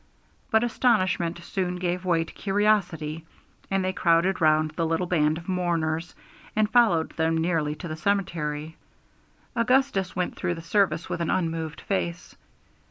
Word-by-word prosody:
But 220 +1 +3
astonishment 185 -8 +1
soon 180 0 -2
gave 180 +1 -2
way 170 -2 +2
to 165 - -12
curiosity, 195 -7 0 0.5
and 195 -1 0
they 185 - 0
crowded 175 +2 +2
round 155 0 +3
the 165 +2 -1
little 165 +3 0
band 155 -3 +2
of 170 - -10
mourners, 170 -3 -1 0.4
and 215 0 +3
followed 215 -8 +3
them 160 0 +1
nearly 160 -3 0
to 170 - -7
the 155 - -4
cemetery. 160 -4 -2 0.8
Augustus 235 -6 +2
went 180 -1 -2
through 175 - -2
the 165 - -8
service 185 -1 +1
with - - -3
an 170 - -1
unmoved 165 -5 -2
face. 85 -2 -3
170 Hz, 150 wpm, -26 LUFS, 160-190 Hz, 0.8 s, But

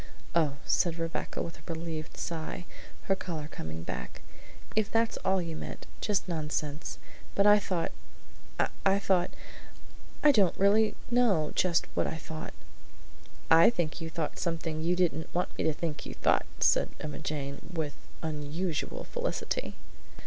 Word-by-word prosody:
"Oh," 155 -5 +3
said 170 -2 +2
Rebecca 165 0 -2
with 165 - -7
a - - -7
relieved 160 -1 -5
sigh, 165 +1 -4 0.4
her 195 - +2
color 160 -6 -4
coming 80 - -6
back; 60 -5 -5 0.5
"if 215 -2 +2
that's 225 0 +2
all 190 0 +2
you 165 -1 -4
meant, - - -6 0.2
just 205 -2 +1
nonsense; 150 -2 -2 0.4
but 200 - +4
I 210 0 +8
thought, 180 -4 -1 0.9
I 195 0 +5
thought 190 -3 +2 0.9
I 300 - +9
don't 200 -9 +4
really 210 +2 +4 0.2
know 210 -11 +4
just 175 -2 +3
what - - +1
I 160 - -3
thought!" 160 -1 -7 1.0
"I 165 +4 +9
think 175 -7 -2
you 165 - -3
thought 160 -2 -3
something 165 -2 -1
you 175 +2 +2
didn't 165 -3 +1
want 180 - 0
me - - -1
to 160 - +3
think 155 -1 -3
you - - -6
thought," - - +3
said - - +4
Emma 150 -1 -5
Jane 140 -2 -3
with 160 -4 -2 0.3
unusual 155 +2 -2
felicity. - - -2
165 Hz, 150 wpm, -30 LUFS, 155-190 Hz, 1.0 s, I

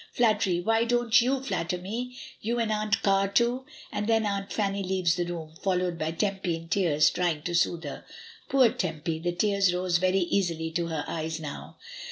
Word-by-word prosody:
"Flattery! 210 -7 +2
why, 225 +4 +2
don't 240 0 0
^'^w 260 +2 +4
flatter 175 -7 -1
me? 235 +7 -5 0.2
you 235 +3 -1
and 230 -2 0
Aunt 210 -2 0
Car 195 0 +3
too?" 240 +5 +1 0.2
And 205 0 -2
then 225 -1 +3
Aunt 200 -1 -2
Fanny 200 -2 -1
leaves 185 -3 +1
the 175 0 -1
room, 165 -3 -6
followed 180 -3 0
by 155 - -1
Tempy 190 +1 -1
in 165 0 -9
tears 165 -5 +3
trying 170 -4 -1
to 175 - -3
soothe 170 -1 +1
her. 145 - -7 0.5
Poor 260 -4 +5
Tempy! 160 -2 -3
the 175 +2 -1
tears 200 +1 +2
rose 180 -1 +1
very 185 +1 +2
easily 170 -3 0
to 170 +1 -1
her 160 -3 -3
eyes 160 0 -3
now. 150 -3 -8
185 Hz, 190 wpm, -27 LUFS, 170-215 Hz, 0.5 s, Poor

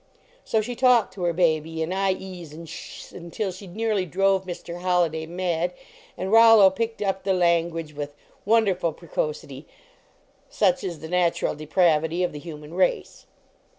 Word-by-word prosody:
So 220 - +1
she 240 +3 -5
talked 245 -6 +3
to 190 - -9
her 170 - +2
baby 160 -2 0
in 165 +3 -3
"ie 190 -1 -2
s" 155 -3 -11
and 165 +1 -10
"sh 160 - -9
s" - - -15
until 185 +4 -4
she 190 +2 -11
nearly 210 0 -1
drove 190 +2 +1
Mr. 175 -1 -7
Holliday 170 -3 +1
mad, 175 0 -1 0.4
and 190 - -3
Rollo 225 -3 +8
picked 225 +2 -3
up 195 -1 -1
the 190 0 +1
language 170 -3 +1
with 145 0 -6 0.3
wonderful 195 -6 +2
precocity, 150 -4 -5 0.8
such 265 0 +1
is 170 -6 -5
the 160 - -6
natural 175 0 +1
depravity 160 +2 +1
of 180 - 0
the 150 - -8
human 150 -1 -10
race. 185 +1 -1
180 Hz, 160 wpm, -24 LUFS, 160-195 Hz, 0.8 s, Rollo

